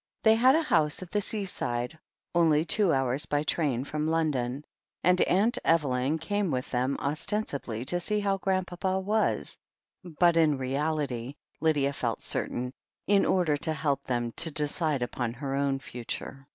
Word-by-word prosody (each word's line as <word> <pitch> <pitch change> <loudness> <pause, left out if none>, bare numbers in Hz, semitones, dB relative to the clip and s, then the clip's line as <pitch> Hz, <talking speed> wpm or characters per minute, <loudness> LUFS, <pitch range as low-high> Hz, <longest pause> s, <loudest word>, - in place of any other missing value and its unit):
They 220 - +6
had 255 +5 +5
a 325 - +2
house 155 - +1
at 175 - -13
die 210 - +1
seaside, 160 - -2 0.3
only 160 -2 +3
two 195 +1 +3
hours 135 +1 +2
by 145 0 0
train 145 -6 0
from 150 +2 -3
London, 150 -4 -1 0.4
and 180 +1 +4
Aunt 210 +6 +2
Evelyn 145 -2 +1
came 205 +4 -1
with 130 -3 -3
them, 130 +2 0
ostensibly 140 - -2
to 175 +6 0
see 210 +4 0
how 200 -1 0
Grandpapa 185 0 -1
was, 210 +3 0 0.4
but 170 0 +2
in 155 -3 +4
reality, 135 -1 -2 0.2
Lydia 145 -3 +1
felt 115 -5 -2
certain, 125 +1 -1 0.3
in 200 -1 +3
order 175 -5 +2
to 160 +2 -1
help 140 -2 -1
them 120 -2 -1
to 165 - +4
decide 150 -2 -1
upon 120 -1 -3
her 135 +2 -5
own 140 0 +1
future. 135 +1 -7
150 Hz, 155 wpm, -28 LUFS, 135-180 Hz, 0.4 s, They